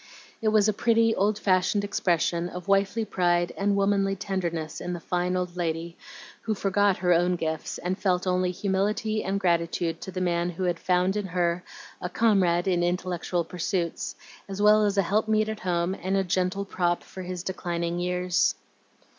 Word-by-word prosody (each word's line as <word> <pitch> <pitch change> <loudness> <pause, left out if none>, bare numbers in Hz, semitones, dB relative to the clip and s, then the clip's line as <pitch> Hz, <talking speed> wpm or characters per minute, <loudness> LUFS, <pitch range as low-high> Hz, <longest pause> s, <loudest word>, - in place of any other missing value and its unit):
It 220 - 0
was 215 -1 +4
a 215 - +2
pretty, 225 +1 +3
old 205 +1 +1
fashioned 195 0 +2
expression 175 -3 0
of 180 +1 -8
wifely 200 +3 +2
pride 175 -3 +1
and 200 0 +1
womanly 195 0 +2
tenderness 170 -5 -3
in 180 - -3
the 175 - -4
fine 180 +2 -1
old 180 -1 -3
lady, 170 -1 -3 0.5
who 220 - -1
forgot 200 0 +2
her 180 - +5
own 175 +1 +2
gifts, 160 -2 -3
and 180 +1 -2
felt 185 -2 0
only 185 0 +1
humility 205 +4 -1
and 195 +1 -1
gratitude 170 -2 0
to - - -6
the 185 - -4
man 175 -1 0
who 175 +2 -5
had 175 -2 0
found 180 +1 +1
in 205 -2 -2
her 175 0 0 0.4
a 180 - -3
comrade 185 -4 +2
in 180 -2 +2
intellectual 175 0 -1
pursuits, 175 0 -3 0.3
as 195 0 -5
well 210 +1 +5
as 200 0 -1
a 195 - +4
helpmeet 215 +3 +1
at 220 -1 -4
home 175 -1 0
and 190 +1 -1
a 195 - +2
gentle 185 +2 -1
prop 175 -3 0
for 190 - -9
his 180 -1 -5
declining 175 -2 -3
years. 180 +1 +1
185 Hz, 180 wpm, -26 LUFS, 175-200 Hz, 0.5 s, her